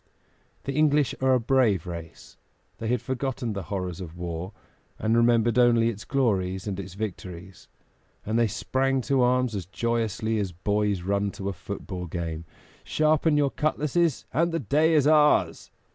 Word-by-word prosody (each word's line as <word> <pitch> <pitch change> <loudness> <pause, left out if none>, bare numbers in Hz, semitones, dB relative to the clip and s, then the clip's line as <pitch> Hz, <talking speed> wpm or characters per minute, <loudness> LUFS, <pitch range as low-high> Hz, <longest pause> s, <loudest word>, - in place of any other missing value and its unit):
The 135 - -3
English 150 -1 +3
are 130 0 +4
a - - +2
brave 115 - +2
race; 85 -2 -9 0.4
they 115 - -4
had 120 0 0
forgotten 130 -3 -3
the 100 - -4
horrors 90 -2 -3
of 85 -1 -8
war, 90 +1 -5 0.5
and 110 +1 +1
remembered 115 0 +3
only 115 -2 +4
its 105 -3 -7
glories 95 -9 0
and 100 -2 -4
its 95 -1 -7
victories; 95 -3 -7 0.6
and 110 +2 0
they 115 - +3
sprang 135 +5 0
to 135 +1 +1
arms 125 -1 +2
as 95 -5 -4
joyously 110 0 -1
as 95 -4 -3
boys 100 +1 0
run 100 +2 0
to 100 0 -4
a - - -3
football 95 -2 -6
game. 85 -1 -4 0.4
"Sharpen 155 0 +2
your 140 -2 +2
cutlasses, 155 +1 0
and 165 +5 +2
the 165 - -1
day 155 +6 +2
is 145 -3 +4
ours!" 150 -1 +3
115 Hz, 160 wpm, -26 LUFS, 95-135 Hz, 0.6 s, are